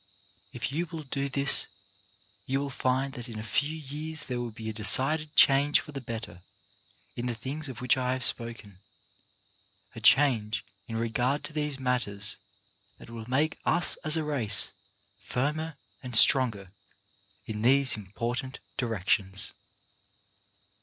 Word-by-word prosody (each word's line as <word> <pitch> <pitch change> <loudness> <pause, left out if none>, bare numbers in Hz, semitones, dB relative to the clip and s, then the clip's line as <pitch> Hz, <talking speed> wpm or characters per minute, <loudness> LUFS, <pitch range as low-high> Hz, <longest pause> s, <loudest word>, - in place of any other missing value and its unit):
If - - -4
you 170 +5 -2
will 160 0 -7
do 140 0 -3
this 140 0 +5 0.8
you 135 +1 0
will 140 0 -4
find 130 +1 -1
that 120 -1 -8
in 110 - -8
a 110 - -5
few 145 +9 -1
years 155 +2 -6
there 125 -2 -4
will 120 -1 -4
be 110 0 -9
a 110 - -3
decided 150 +8 +3
change 140 +2 +5
for 150 - -10
the 140 -2 -6
better 110 -7 -7 0.7
in 120 +1 -4
the 120 - -2
things 135 +6 -5
of 125 -3 -8
which 125 +1 +3
I 125 0 0
have 130 -1 -3
spoken, 115 -6 +2 1.1
a 115 - -9
change 110 -5 +3 0.2
in 115 - -6
regard 120 +5 -1
to - - -6
these 150 -2 -2
matters 115 -6 0 0.6
that - - -14
will 115 0 -8
make 150 +5 0
us 175 - +3
as 155 +1 +2
a 160 - -1
race 120 -10 +2 0.5
firmer 150 +9 -3 0.3
and 125 -2 -4
stronger 110 -5 +5 0.7
in 105 -1 -5
these 135 +2 +5
impor 110 +4 -4
tant 130 -2 -7 0.2
directions. 100 -4 -1
125 Hz, 150 wpm, -28 LUFS, 110-145 Hz, 1.1 s, this